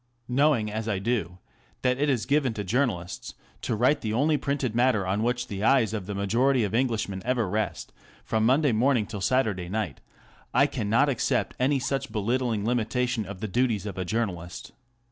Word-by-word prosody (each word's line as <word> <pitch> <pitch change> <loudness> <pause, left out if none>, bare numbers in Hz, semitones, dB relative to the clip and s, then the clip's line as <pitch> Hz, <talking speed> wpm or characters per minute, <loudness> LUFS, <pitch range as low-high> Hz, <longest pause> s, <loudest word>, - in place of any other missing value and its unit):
Knowing 125 -4 +2
as 110 +1 -3
I 100 - 0
do 100 -3 -2 0.5
that 125 0 +2
it 145 +1 +2
is 125 -6 0
given 140 -5 +1
to 105 - -3
journalists 100 -5 -2 0.3
to 115 - -1
write 125 +7 +2
the 110 -1 -2
only 150 +6 +2
printed 140 -5 -1
matter 120 -4 +2
on 95 +3 0
which 120 +1 0
the 100 -3 -5
eyes 115 -3 +3
of 100 -4 -4
the 100 - -4
majority 120 +6 +2
of 105 - -2
Englishmen 115 -6 0
ever 120 -3 0
rest 105 +3 -3 0.3
from 110 0 0
Monday 135 +4 +3
morning 120 0 +2
till 105 -2 -7
Saturday 100 -6 0
night, 105 - -3 0.5
I - - +6
cannot 115 +7 +1
accept 135 -5 0
any 135 +3 +2
such 135 +1 -2
be - - -4
littling 115 0 0
limitation 120 -1 0
of 100 -1 -8
the 110 - -2
duties 110 -1 0
of 100 -3 -5
a - - 0
journalist. 90 -4 -3
115 Hz, 185 wpm, -26 LUFS, 105-130 Hz, 0.5 s, I